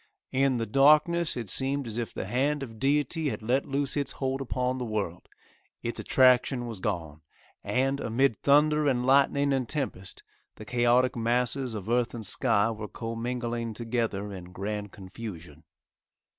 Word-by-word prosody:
In 135 -1 +2
the 115 - -1
darkness 155 +6 +4
it 115 -3 -4
seemed 135 +7 0
as 115 0 -3
if 115 - -3
the - - -5
hand 135 +7 0
of 115 -4 -9
Deity 145 +3 +1
had 110 - -5
let 125 +5 +1
loose 140 0 -1
its 145 -1 -1
hold 135 0 -2
upon 125 0 -2
the - - -2
world, 105 -6 -4 0.5
its 120 - -3
attraction 130 -1 +3
was 115 -4 -6
gone, 80 -7 -4 0.4
and, 135 +2 0
amid 120 0 +1
thunder 150 +1 +4
and 125 -3 +1
lightning 140 +1 +3
and 130 -3 -1
tempest, 130 -11 -4 0.3
the 110 - -10
chaotic 125 +2 +2
masses 120 +1 0
of 100 -2 -6
earth 120 +1 +1
and 110 -2 -6
sky 105 +2 +3
were 110 -1 -6
commingling 115 0 -4
together 110 -3 -2
in 90 -2 -8
grand 100 +3 -5
confusion. 95 -6 -9
120 Hz, 155 wpm, -28 LUFS, 110-135 Hz, 0.5 s, darkness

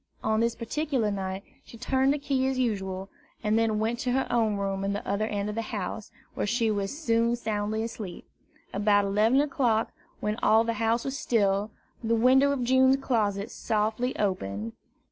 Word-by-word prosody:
On 220 0 +1
this 230 0 +1
particular 255 -2 -1
night 190 -1 -4 0.2
she 230 - -13
turned 265 +3 +2
the 290 - +1
key 275 -2 0
as 265 -1 -1
usual, 195 -6 -2 0.3
and 210 +1 +2
then 225 -1 +2
went 225 +2 -1
to 255 -3 -1
her 265 +1 +1
own 225 -3 +2
room 195 -1 -2
at 200 0 0
the 200 - -5
other 210 +2 0
end 205 -2 -2
of 210 - -3
the 225 - -2
house, 210 -1 -5 0.2
where - - -2
she 230 0 +1
was 200 +5 -2
soon 230 -5 +2
soundly 215 -1 -2
asleep. 215 -5 -7 0.5
About 205 0 +3
eleven 215 +6 +3
o'clock, 245 -6 +1 0.3
when 210 +1 -2
all 220 +1 +5
the 230 0 -1
house 230 +1 +1
was 275 +1 -3
still, 205 -4 +1 0.3
the 230 +1 +2
window 260 +4 +5
of 270 -3 -1
June's 260 +2 +4
closet 215 -6 -1
softly 220 +4 -1
opened. 115 - -2
220 Hz, 185 wpm, -27 LUFS, 205-245 Hz, 0.5 s, all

